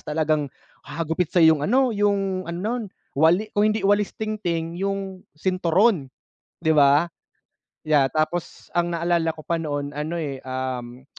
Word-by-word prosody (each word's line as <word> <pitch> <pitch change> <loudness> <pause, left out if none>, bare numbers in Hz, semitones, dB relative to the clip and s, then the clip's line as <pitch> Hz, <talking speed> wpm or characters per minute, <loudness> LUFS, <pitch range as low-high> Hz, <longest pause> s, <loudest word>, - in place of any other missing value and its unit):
talagang 150 -1 0 0.3
hahagupit 160 +3 -2
sa 175 - +3
yung 160 -2 +5
ano, 250 - +2
yung 195 -3 0
ano, 210 +8 -2
no'n - - -5 0.3
wali 175 +7 +3
kung 210 +1 +3
hindi 215 +1 0
walis 205 0 +2
ting-ting 175 -6 -3
yung 195 -1 -3 0.2
sinturon, 185 - +2 0.5
di 160 -2 +2
ba? 145 +3 +5 0.8
Yeah, 145 -3 +4
tapos 155 +2 -3
ang 175 0 +1
naalala 170 -1 +1
ko 155 - -11
pa 170 -1 -1
noon 145 -2 -3
ano, 155 +4 -3
eh, 140 -5 -4
um, 130 -1 -5
170 Hz, 145 wpm, -23 LUFS, 150-195 Hz, 0.8 s, yung